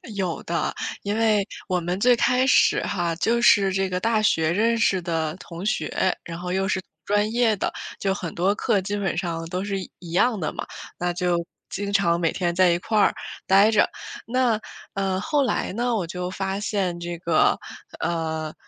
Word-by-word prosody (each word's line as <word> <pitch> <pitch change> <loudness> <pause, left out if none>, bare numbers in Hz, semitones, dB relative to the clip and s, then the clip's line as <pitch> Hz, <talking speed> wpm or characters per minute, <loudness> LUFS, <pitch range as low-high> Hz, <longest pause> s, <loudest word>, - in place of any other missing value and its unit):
有 185 -4 -2
的， 170 0 -1 0.3
因 205 +2 -1
为 215 -3 +3 0.2
我 180 -2 +1
们 175 +2 -2
最 245 +3 +5
开 250 +2 +2
始 - - +4
哈， 175 -3 -1
就 235 +7 +1
是 200 -4 +5
这 190 0 0
个 180 - -1
大 225 +2 +1
学 160 -6 +2
认 230 +5 +2
识 195 -4 +2
的 160 -2 -2
同 175 +1 -8
学， 190 -3 0
然 165 0 -7
后 180 0 -4
又 190 0 0
是 190 0 0 0.2
专 205 +1 +1
业 235 -2 +3
的， 190 - -2 0.3
就 195 -1 +1
很 180 -4 -5
多 185 +4 +2
课 210 -3 +1
基 200 +2 -3
本 190 -5 -1
上 165 -2 -2
都 180 +1 -2
是 200 -1 -2
一 185 - -8
一 170 -2 -10
样 215 +5 +2
的 155 - -2
嘛， - - -5 0.3
那 175 0 0
就 175 0 +1 0.3
经 200 0 -3
常 170 -4 +3
每 165 -2 +1
天 175 -2 -1
在 185 +1 +4
一 170 - +2
块 215 +4 -1
儿 - - +4 0.3
待 200 +3 +6
着。 215 - +4 0.4
那， 240 -2 +2 0.3
呃， 195 -1 -1
后 285 +7 +1
来 - - -1
呢 240 +1 0
我 190 - -1
就 180 +2 -4
发 195 +1 -3
现 190 -5 -1
这 175 0 -5
个， 165 -2 +3 0.4
呃， 160 -2 -2
190 Hz, 210 characters per minute, -24 LUFS, 175-210 Hz, 0.4 s, 待